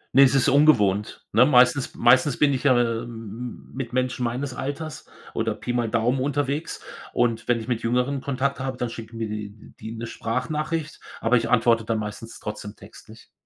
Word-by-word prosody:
Ne, 135 Hz, -, +8 dB
es 135 Hz, 0 st, +6 dB
ist 135 Hz, -, +3 dB
ungewohnt, 105 Hz, -9 st, +3 dB
ne? 120 Hz, -, +6 dB
Meistens 125 Hz, 0 st, +4 dB
meistens 125 Hz, +3 st, +4 dB
bin 145 Hz, -2 st, +3 dB
ich 130 Hz, -, -2 dB
ja 125 Hz, -3 st, +5 dB
m 120 Hz, -, +3 dB, 0.2 s
m 115 Hz, +1 st, -8 dB
mit 125 Hz, -2 st, -5 dB
Menschen 125 Hz, -1 st, 0 dB
meines 125 Hz, +3 st, -2 dB
Alters 145 Hz, +4 st, -5 dB, 0.3 s
oder -, -, -1 dB
Pi 120 Hz, -, -4 dB
mal 120 Hz, -2 st, 0 dB
Daumen 120 Hz, +3 st, +1 dB
unterwegs 145 Hz, +2 st, -2 dB, 0.3 s
und 120 Hz, -2 st, 0 dB
wenn 120 Hz, -1 st, +2 dB
ich 110 Hz, -, -8 dB
mit 120 Hz, -2 st, -1 dB
Jüngeren 125 Hz, +3 st, 0 dB
Kontakt 140 Hz, 0 st, -1 dB
habe, 130 Hz, -1 st, -3 dB
dann 120 Hz, -2 st, -3 dB
schicken 115 Hz, 0 st, -9 dB
mir 115 Hz, -1 st, -2 dB
die 105 Hz, -1 st, -5 dB, 0.3 s
die 110 Hz, -, -7 dB
'ne 115 Hz, 0 st, -5 dB
Sprachnachricht. 150 Hz, +8 st, -3 dB, 0.2 s
Aber 115 Hz, +2 st, +2 dB
ich 115 Hz, -, -1 dB
antworte 115 Hz, -1 st, +3 dB
dann 110 Hz, 0 st, -1 dB
meistens 110 Hz, +2 st, -6 dB
trotzdem 105 Hz, -1 st, -6 dB
Textlich. -, -, -15 dB
125 Hz, 185 wpm, -24 LUFS, 115-135 Hz, 0.3 s, Ne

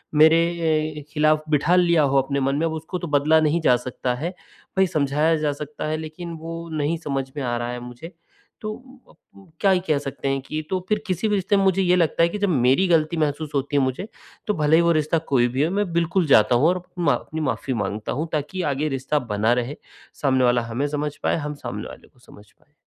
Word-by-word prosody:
मेरे 160 Hz, +2 st, +7 dB
ए 160 Hz, -3 st, -1 dB
खिलाफ 155 Hz, 0 st, +2 dB
बिठा 150 Hz, +3 st, +3 dB
लिया 170 Hz, -3 st, +4 dB
हो 140 Hz, -1 st, +2 dB
अपने 140 Hz, +1 st, -2 dB
मन 135 Hz, +1 st, 0 dB
में 155 Hz, +3 st, 0 dB
अब 160 Hz, -, -1 dB
उसको 160 Hz, +3 st, -5 dB
तो 175 Hz, -, -5 dB
बदला 150 Hz, +2 st, +3 dB
नहीं 155 Hz, +2 st, +1 dB
जा 125 Hz, -5 st, +4 dB
सकता 125 Hz, 0 st, -3 dB
है। 165 Hz, +8 st, -4 dB, 0.4 s
भई 190 Hz, 0 st, +4 dB
समझाया 150 Hz, 0 st, +1 dB
जा 150 Hz, -1 st, 0 dB
सकता 150 Hz, +1 st, -7 dB
है, 155 Hz, 0 st, -1 dB
लेकिन 160 Hz, +2 st, -7 dB
वो 165 Hz, +1 st, -6 dB
नहीं 155 Hz, +2 st, 0 dB
समझ 140 Hz, -4 st, -2 dB
में 145 Hz, -, -4 dB
आ 120 Hz, -1 st, -1 dB
रहा 120 Hz, 0 st, -3 dB
है 125 Hz, -, -5 dB
मुझे, 125 Hz, +7 st, -10 dB, 0.5 s
तो 215 Hz, 0 st, -4 dB, 0.4 s
अ -, -, -18 dB
प 195 Hz, -, -21 dB
क्या 195 Hz, -, +4 dB
ही 185 Hz, -, +3 dB
कह 155 Hz, -2 st, +2 dB
सकते 140 Hz, -1 st, -5 dB
हैं? 135 Hz, 0 st, 0 dB
कि 155 Hz, +4 st, -4 dB
तो 185 Hz, -, 0 dB
फिर 210 Hz, -1 st, +1 dB
किसी 185 Hz, +3 st, -1 dB
भी 210 Hz, -, +1 dB
रिश्ते 200 Hz, +1 st, +1 dB
में 195 Hz, -, +2 dB
मुझे 190 Hz, 0 st, +3 dB
ये 180 Hz, -1 st, +3 dB
लगता 165 Hz, -1 st, +2 dB
है 170 Hz, -, +4 dB
कि 210 Hz, -, -4 dB
जब 200 Hz, -1 st, +1 dB
मेरी 135 Hz, +4 st, +3 dB
गलती 165 Hz, -1 st, +2 dB
महसूस 150 Hz, 0 st, -1 dB
होती 140 Hz, +1 st, -1 dB
है 140 Hz, -, +4 dB
मुझे, 130 Hz, +10 st, -2 dB, 0.4 s
तो 210 Hz, -, +2 dB
भले 155 Hz, -3 st, +3 dB
ही 165 Hz, -, +5 dB
वो 170 Hz, 0 st, +3 dB
रिश्ता 155 Hz, 0 st, +1 dB, 0.2 s
कोई 120 Hz, -2 st, +4 dB
भी 130 Hz, +4 st, 0 dB
हो, 160 Hz, -, 0 dB
मैं 200 Hz, -2 st, -1 dB
बिल्कुल 170 Hz, +2 st, +1 dB
जाता 120 Hz, -3 st, +5 dB
हूँ 130 Hz, +6 st, +4 dB
और 180 Hz, -, +2 dB
अप 180 Hz, -, -11 dB
मा 165 Hz, -5 st, +3 dB
अपनी 160 Hz, 0 st, -4 dB
माफ़ी 130 Hz, -1 st, -2 dB
माँगता 105 Hz, -1 st, -3 dB
हूँ 155 Hz, +5 st, -2 dB
ताकि 155 Hz, +5 st, -2 dB
आगे 145 Hz, +3 st, -1 dB
रिश्ता 135 Hz, +2 st, -1 dB
बना 110 Hz, +3 st, +2 dB
रहे, 125 Hz, +3 st, -2 dB, 0.4 s
सामने 130 Hz, -2 st, +2 dB
वाला 120 Hz, 0 st, +3 dB
हमें 115 Hz, +5 st, -2 dB
समझ 150 Hz, 0 st, -3 dB
पाए, -, -, +2 dB
हम 150 Hz, -2 st, -4 dB
सामने 120 Hz, -7 st, -6 dB
वाले -, -, -13 dB
को 130 Hz, -, -29 dB
समझ 105 Hz, -4 st, -16 dB
पाएँ। 150 Hz, -, -34 dB
150 Hz, 245 wpm, -23 LUFS, 135-170 Hz, 0.5 s, मेरे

